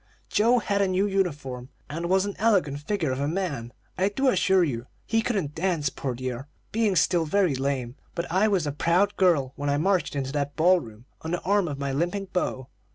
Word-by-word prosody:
Joe 230 +4 +4
had 200 -3 0
a 200 - +3
new 185 +2 +1
uniform, 145 -11 -2 0.2
and 165 +4 -4
was 190 +1 +3
an 205 - -3
elegant 190 -10 +2
figure 160 -2 -1
of 130 - -2
a 140 - 0
man, 150 -9 -3 0.3
I 190 +2 +3
do 265 +6 +1
assure 190 -6 +3
you. 125 -6 -3 0.2
He 225 0 +1
couldn't 195 - -1
dance, 160 -4 0
poor 130 -3 -4
dear, 130 +2 -5 0.2
being 215 -3 +1
still 175 -1 +3
very 185 -2 +2
lame: 130 -2 -2 0.2
but 170 - -2
I 190 +5 +3
was 195 -6 +1
a 145 - -1
proud 175 +7 +2
girl 155 -8 +2
when 145 0 -2
I 140 - +2
marched 185 0 +1
into 135 -1 -2
that 145 0 -2
ball 180 +3 +5
room, 115 -4 -12 0.2
on 160 - -5
the 175 +1 -1
arm 200 -1 +2
of 145 -3 -4
my 140 -1 -2
limping 175 +7 -2
beau. 130 -7 -1
170 Hz, 215 wpm, -26 LUFS, 140-195 Hz, 0.3 s, ball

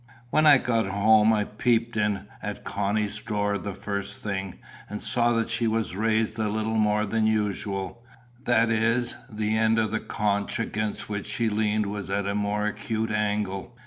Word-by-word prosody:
When 155 0 +4
I 145 -2 +9
got 115 -5 0
home, 105 +2 +4
I 105 -2 +2
peeped 115 +2 0
in 105 -1 0 0.2
at - - -5
Connie's 105 +1 -1
door 105 -2 -1
the 100 +1 -5
first 100 0 -4
thing, 95 -3 -3 0.3
and 105 - -5
saw 120 +2 +2
that 115 0 0
she 115 0 +1
was 110 -4 -1
raised 110 +1 0
a 110 -1 +1
little 110 +1 -1
more 105 -1 +2
than 110 +1 +1
usual; 105 0 -2 0.4
that 115 -1 +3
is, 115 +2 +2 0.2
the 105 0 -1
end 110 0 +3
of 110 -2 +1
the 110 - 0
conch 100 -1 -1
against 110 -2 -2
which 105 -1 -4
she 110 +2 0
leaned 105 0 +1
was 100 -1 -5
at 100 0 -1
a 100 - -1
more 105 0 -1
acute 110 +1 -2
angle. 105 +1 -2
105 Hz, 175 wpm, -26 LUFS, 105-115 Hz, 0.4 s, I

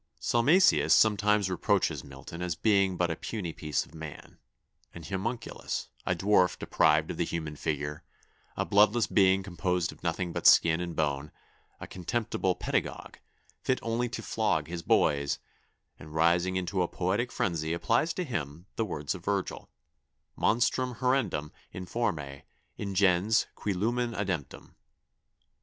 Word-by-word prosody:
] - - -41
"Salmasius 150 +11 +4
sometimes 105 -2 +3
reproaches 90 -2 0
Milton 70 +5 -10
as 90 -2 -2
being 100 -1 +2
but 90 -1 +1
a - - -2
puny 90 -5 -5
piece 75 -5 -2
of - - -20
man, 80 -2 -10 0.6
an 85 - -9
homunculus, 100 +8 -4 0.2
a 90 - +2
dwarf 95 0 +3
deprived - - +2
of - - -6
the - - +1
human 80 -3 -4
figure, 75 -1 -3 0.5
a - - 0
bloodless 105 +3 +4
being 95 -1 +3
composed 90 -2 -1
of - - -16
nothing 85 0 -2
but - - +2
skin 85 +1 +6
and 85 -1 -4
bone, 75 -1 -1 0.5
a - - -6
contemptible 95 0 -2
pedagogue, - - -3 0.4
fit 130 - +1
only 115 +2 -1
to 120 - -6
flog 80 -9 0
his 85 0 -5
boys; 70 -3 +2 0.6
and 75 +2 -11
rising 85 +3 +2
into 95 +1 -1
a 90 - +1
poetic 100 +9 -1
frenzy 80 -3 -1
applies 115 - +1
to 180 - -3
him 85 - -5
the 115 - +1
words 75 -7 -3
of 90 -3 -9
Virgil: 100 -1 -2 0.7
'_Monstrum 125 +2 +1
horrendum, 120 - 0 0.2
informe, 80 -9 -3 0.4
ingens, 100 +1 +2
cui 105 - -3
lumen 120 +5 0
ademptum. 95 - -4
90 Hz, 145 wpm, -29 LUFS, 80-110 Hz, 0.7 s, skin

